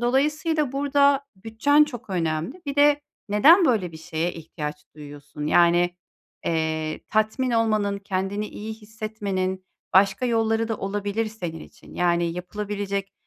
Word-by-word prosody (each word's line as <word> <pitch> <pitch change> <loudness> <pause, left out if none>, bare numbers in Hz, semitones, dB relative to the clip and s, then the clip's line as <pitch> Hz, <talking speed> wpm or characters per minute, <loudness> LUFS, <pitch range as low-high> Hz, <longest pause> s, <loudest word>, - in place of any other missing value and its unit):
dolayısıyla 295 +3 +1
burada, 280 0 +3
bütçen 230 +9 +3
çok 245 -7 -9
önemli. 165 - -2
Bir 280 - -3
de 290 0 +5 0.3
neden 310 - +6
böyle 205 - +1
bir - - -9
şeye 160 +2 -3
ihtiyaç 150 -2 -7
duyuyorsun? 150 0 -8
Yani, 175 +2 +4 0.5
eee, 160 -1 -1
tatmin 220 +4 +1
olmanın, 215 -3 +1
kendini 195 +2 -2
iyi 220 +1 -7
hissetmenin, 210 -4 -4 0.3
başka 195 +5 +4
yolları 225 -1 +1
da 225 - -1
olabilir 205 +2 -2
senin 175 -7 -6
için, - - -15
yani, 175 -1 +2
yapılabilecek, 200 +2 -4
205 Hz, 125 wpm, -24 LUFS, 175-240 Hz, 0.5 s, neden